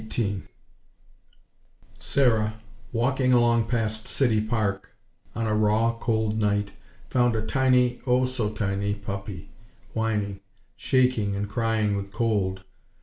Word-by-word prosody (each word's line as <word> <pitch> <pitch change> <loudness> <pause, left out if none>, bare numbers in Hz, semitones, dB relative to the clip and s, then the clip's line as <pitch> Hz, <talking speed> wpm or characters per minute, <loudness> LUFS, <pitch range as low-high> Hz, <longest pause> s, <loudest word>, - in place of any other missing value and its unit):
XVIII 100 -4 -1 1.6
Sarah, 110 -6 +2 0.4
walking 130 +2 +1
along 120 -2 +4
past 110 -2 -1
City 115 -6 +2
Park 110 -3 -1 0.5
on 115 0 -1
a 110 - 0
raw, 110 +2 +2
cold 110 -2 0
night, 105 -1 +1 0.4
found 120 -2 +2
a 110 0 -1
tiny, 125 -1 +2
oh 125 +1 +3
so 125 -4 -1
tiny, 100 -1 -1
puppy, 100 -3 -7 0.4
whining, 105 -3 -1 0.4
shaking 125 -6 +1
and 100 +1 -2
crying 110 -1 0
with 100 0 -5
cold. 100 -5 0
110 Hz, 115 wpm, -26 LUFS, 105-120 Hz, 1.6 s, along